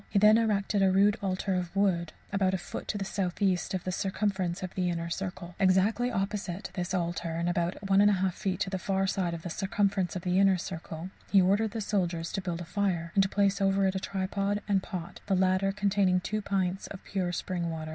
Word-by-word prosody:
He - - 0
then 215 +2 +7
erected 205 -2 +1
a 190 -1 +4
rude 200 +2 +4
altar 190 0 -1
of 180 0 -2
wood, 175 -5 +1 0.2
about 190 -1 +2
a - - 0
foot 175 - -7
to 210 - -2
the 195 - -3
southeast 190 -1 0
of 185 - -3
the 185 - -2
circumference 190 -1 -1
of 185 - -5
the 180 -1 0
inner 170 -1 -3
circle. 180 -1 -5
Exactly 200 +6 +3
opposite 195 -3 -3
this 180 -1 -3
altar, 170 -1 -2
and 170 +1 -1
about 175 +3 -1
1 195 0 +4
1/2 190 -3 +3
feet 190 -1 -2
to 190 - -1
the 190 - -2
far 195 +1 0
side 180 -3 -1
of 165 - -9
the 175 - -5
circumference 195 0 0
of 180 - -4
the 180 +1 +2
inner 195 -1 +5
circle, 170 0 -6 0.2
he 200 - +6
ordered 200 +4 +3
the 225 +1 -4
soldiers 175 -5 -1
to 195 - -2
build 175 -2 -3
a - - -6
fire, 180 -2 -1
and 195 - +4
to 195 - +1
place 200 0 +1
over 195 0 +3
it 190 - +2
a 190 - -1
tripod 200 +1 -2
and 200 -2 +2
pot, 180 -2 -6
the 195 - +2
latter 185 +1 +2
containing 195 -2 +2
two 215 +4 -2
pints 190 -2 -1
of 190 - -9
pure 185 -3 -2
spring 175 -1 -2
water. 160 -1 -5
190 Hz, 225 wpm, -29 LUFS, 180-200 Hz, 0.2 s, then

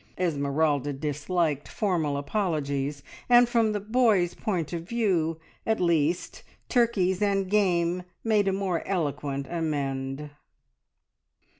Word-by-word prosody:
Esmeralda 145 -3 0
disliked 150 +1 -1
formal 165 -9 0
apologies, 145 -5 -2 0.3
and 245 0 +7
from 230 -2 +2
the 210 - -1
boys' 210 -4 +2
point 180 -7 -2
of 170 - -2
view, 180 -9 +1 0.2
at 220 0 0
least, 170 -1 0 0.3
turkeys 205 -7 +2
and 195 -2 +1
game 180 -4 +2 0.2
made 215 -3 +2
a - - +3
more 190 -3 -1
eloquent 145 -6 -2
amende. 145 -3 -3
170 Hz, 110 wpm, -27 LUFS, 145-200 Hz, 0.3 s, and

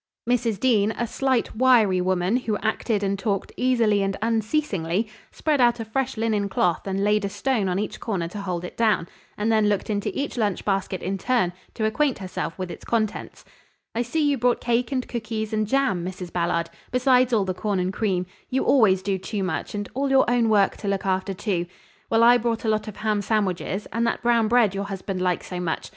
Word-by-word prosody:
Mrs. 235 -4 +1
Dean, 215 -5 +3
a 240 - 0
slight, 260 0 0
wiry 220 -7 +4
woman, 185 +3 +1
who 225 -4 -1
acted 215 0 -1
and 195 0 -1
talked 200 -1 -2
easily 230 -5 +2
and 195 0 -1
unceasingly, 220 - 0 0.2
spread 300 -4 0
out 240 -1 +4
a 225 - -4
fresh 260 +3 -2
linen 215 -3 0
cloth 180 -1 0
and 195 +1 -1
laid 210 0 +2
a 200 - -1
stone 220 -2 0
on 180 - 0
each 210 +1 -3
corner 190 -7 -2
to 205 +3 -6
hold 180 -3 -3
it 180 - -7
down, 215 -7 +2 0.3
and 215 +2 0
then 215 -1 +3
looked 205 +1 -1
into 205 -1 -1
each 280 -2 -3
lunch 210 -5 -1
basket 195 -2 -1
in 195 +1 -2
turn, 240 -8 +1 0.2
to 220 - -1
acquaint 265 +5 +1
herself 185 -2 -5
with 185 -2 -4
its - - -9
contents. 220 -3 -2 0.5
"I 230 - 0
see 295 +6 0
you 280 -3 +1
brought 245 0 +2
cake 240 +1 0
and 255 -2 -1
cookies 220 -2 -4
and 215 -1 0
jam, 255 -8 +1
Mrs. 180 -1 -6
Ballard, 170 -1 0 0.2
besides 250 0 +3
all 215 -4 +2
the 185 - -1
corn 205 +1 -2
and 180 +1 -1
cream 190 -4 0 0.2
you 265 - 0
always 195 -8 +4
do 195 -1 -1
too 195 +2 -3
much, 185 - -3
and 205 -1 -3
all 275 +2 -1
your 270 0 +4
own 240 -2 +2
work 205 -3 +3
to 205 - -6
look 195 -1 -1
after, 190 +1 -1
too. 180 -3 -2 0.4
Well, 225 0 +4
I 240 +1 +7
brought 230 0 -1
a - - +2
lot 215 0 0
of 215 - -7
ham 215 -1 0
sandwiches 200 -1 -1
and 230 +1 +1
that - - -2
brown 235 -2 +3
bread 230 -3 +4
your 200 0 -3
husband 195 -1 -4
likes 180 -1 0
so 180 - -5
much. 170 -2 -3
215 Hz, 215 wpm, -24 LUFS, 190-235 Hz, 0.5 s, I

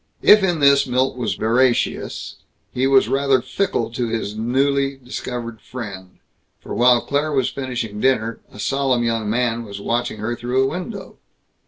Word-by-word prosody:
If 210 0 +8
in 175 -5 0
this 140 0 +5
Milt 130 +1 +1
was 120 -4 -2
veracious, 120 +2 0 0.4
he 130 +2 +1
was 135 -1 +4
rather 135 -1 +2
fickle 120 - -2
to 120 0 -2
his 110 -2 -3
newly 135 +4 0
discovered 120 -3 -6
friend; 100 -7 -8 0.4
for - - -8
while 120 0 +4
Claire 145 +2 -1
was 130 -3 +1
finishing 120 -6 -4
dinner, 115 -3 +1
a - - -14
solemn 130 +2 0
young 115 -2 -1
man 120 0 0
was 100 -2 -8
watching 120 +2 -2
her 110 +3 -3
through 125 +2 0
a - - +2
window. 185 +4 -7
125 Hz, 160 wpm, -21 LUFS, 115-135 Hz, 0.4 s, If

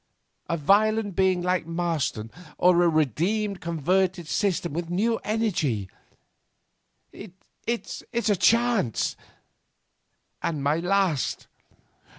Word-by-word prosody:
A 170 - 0
violent 205 +4 +2
being 185 -2 +2
like 180 -2 0
Marston, 160 -10 -2 0.3
or 180 -1 +4
a 175 - +4
redeemed, 180 - 0
converted 175 +2 0
system 175 -4 -1
with 170 +1 -3
new 220 +6 +1
energy? 170 - -1 1.2
It's 210 +4 -7
a 230 -3 +1
chance, 230 - +2 1.3
and 155 -4 -2
my 145 +3 +2
last. 180 -4 0
180 Hz, 95 wpm, -25 LUFS, 165-205 Hz, 1.3 s, or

